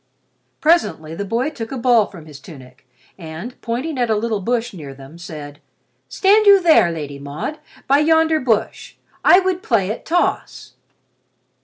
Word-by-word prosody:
Presently 300 - +1
the 200 - -4
boy 240 +9 -1
took 225 -6 -7
a 270 - -4
ball 235 -3 +3
from 170 -6 -13
his 150 -3 -12
tunic, 130 -3 -15 0.3
and, 165 +9 -8
pointing 255 +5 -3
at 240 -2 0
a 220 - +2
little 220 0 -1
bush 240 +3 -2
near 145 -7 -9
them, 135 +5 -14
said, 150 -4 -9 0.5
"Stand 415 +2 +3
you 400 -1 +8
there, 320 - +4
Lady 145 -4 -6
Maud, 145 - -6 0.3
by 280 +2 +4
yonder 320 +1 +3
bush. 230 -6 -2 0.3
I 360 - +7
would 370 -1 -1
play 210 - 0
at 220 - -7
toss." 350 +2 -2
225 Hz, 160 wpm, -19 LUFS, -, 0.5 s, you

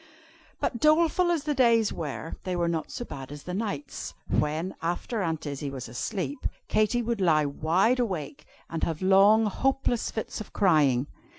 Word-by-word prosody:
But 235 - -1
doleful 330 +4 +4
as 335 -4 +1
the 300 -1 0
days 235 -5 +3
were, 160 0 -5
they 185 -1 -2
were 170 -1 +1
not 165 -2 -2
so 240 - -5
bad 135 - -8
as 145 -1 -9
the 180 - -5
nights, 185 -8 -4
when, 155 +5 0
after 175 +7 -2
Aunt 160 -3 -2
Izzie 140 0 -4
was 130 -2 -6
asleep, 140 - -3 0.2
Katy 215 +3 +2
would 230 -3 -2
lie 155 -4 +4
wide 170 - +2
awake, 155 - -3 0.2
and 165 - -5
have 165 +2 -1
long, 200 +4 +6
hopeless 245 +2 0
fits 220 - -4
of 215 - -10
crying. 145 -9 +3
185 Hz, 170 wpm, -27 LUFS, 150-230 Hz, 0.2 s, long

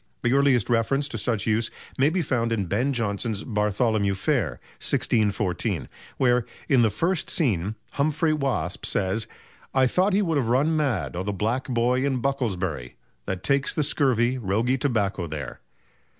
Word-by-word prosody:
The 120 - +2
earliest 135 -5 +3
reference 125 +4 +1
to 115 - -4
such 110 -1 -1
use 110 +1 +2 0.3
may 135 +3 +3
be 175 +1 0
found 115 -5 0
in 105 -4 0
Ben 115 +10 0
Jonson's 110 -3 -2
"Bartholomew 105 -2 +1
Fair," 95 - 0 0.2
1614, 105 -4 0 0.3
where, 125 -1 +3 0.2
in 135 -4 +4
the 115 - +4
first 170 - -1
scene, 105 - 0 0.2
Humphrey 155 +2 +1
Waspe 140 -3 -2
says: 100 +3 0 0.5
"I 130 -1 +5
thought 185 +10 +2
he 205 +2 +3
would 165 -5 0
have 120 -4 -1
run 145 +6 +2
mad 135 - 0
o' 90 - -2
the 100 +2 -2
Black 110 +6 -1
Boy 125 +1 +1
in 135 -2 0
Bucklersbury, 95 - -2 0.3
that 95 -1 -3
takes 140 0 +1
the 155 - +1
scurvy, 130 -4 +1
roguy 115 +5 +1
tobacco 100 -9 0
there." 75 -3 -6
120 Hz, 160 wpm, -25 LUFS, 100-140 Hz, 0.5 s, I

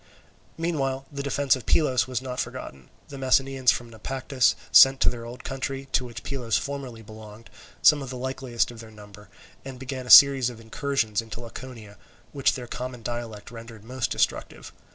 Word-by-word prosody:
Meanwhile 135 -5 -2
the 140 -1 -5
defence 140 -1 +1
of 130 - -10
Pylos 130 -7 +2
was 130 0 -3
not 125 -1 -5
forgotten; 95 - -6 0.2
the 140 - -8
Messenians 135 0 +2
from 120 -1 0
Naupactus 130 +3 0 0.2
sent 135 0 +8
to - - +5
their 115 -1 -8
old 125 +2 -10
country, 135 0 -5
to 125 - +1
which 120 -2 -9
Pylos 120 -8 -1
formerly 130 0 -6
belonged, 110 +1 -13 0.3
some 150 -1 +6
of 135 - -7
the 130 - -6
likeliest 130 -2 -2
of 120 - -12
their 110 -1 -11
number, 105 -2 -15 0.3
and 135 -1 -8
began 130 0 -6
a - - -9
series 135 -3 +8
of 120 -2 -11
incursions 115 -2 -1
into 115 0 -9
Laconia, 115 -4 -10 0.3
which 140 -2 +2
their 125 -2 -6
common 125 0 -7
dialect 120 -2 -6
rendered 115 -2 -11
most 125 +2 -3
destructive. - - -2
125 Hz, 175 wpm, -25 LUFS, 115-135 Hz, 0.3 s, sent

